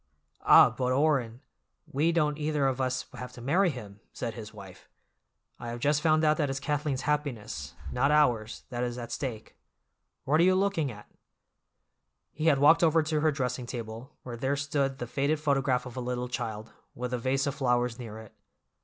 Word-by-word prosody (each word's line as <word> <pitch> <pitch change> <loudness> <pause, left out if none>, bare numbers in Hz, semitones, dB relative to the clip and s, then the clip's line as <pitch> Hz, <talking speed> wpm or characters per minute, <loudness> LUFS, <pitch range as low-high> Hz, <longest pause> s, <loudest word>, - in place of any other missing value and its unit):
"Ah, - - +7
but, 125 +1 -1
Orrin, 130 -4 +1 0.4
we 155 +5 +1
don't 150 -3 +1
either 150 -2 0
of 135 -1 0
us 130 0 -1
have 125 0 -7
to 125 - -11
marry 175 +10 +2
him," 105 -8 -8
said 115 -2 -4
his 110 -2 -8
wife. 100 -4 -13 0.7
"I - - -7
have 120 +1 -5
just 145 +4 +2
found 155 0 +3
out 155 0 +4
that 145 -3 0
it's 135 0 -2
Kathleen's 145 -1 -2
happiness, 120 - -3 0.2
not 135 +3 +2
ours, 120 -8 +2
that 120 -2 -3
is 120 0 -3
at 120 -1 -7
stake. 120 -6 -5 0.7
What 150 +4 +2
are - - +6
you 185 +1 +5
looking 185 -8 +1
at?" 105 -2 -12 1.2
He 155 +1 -2
had 145 -4 +5
walked 150 +4 +6
over 165 -1 +4
to 155 0 0
her 155 +1 +3
dressing 125 -3 -3
table, 115 +3 -7
where 120 -2 -6
there 135 +4 0
stood 140 -1 -1
the 120 - -4
faded 140 +5 0
photograph 135 -4 +1
of 125 - -9
a 130 - -3
little 125 0 -3
child, 110 -2 -5 0.2
with 125 +1 -4
a 125 - -1
vase 135 +3 0
of 140 - -1
flowers 125 -2 0
near 110 -3 -7
it. 110 -1 -12
130 Hz, 190 wpm, -29 LUFS, 120-150 Hz, 1.2 s, Ah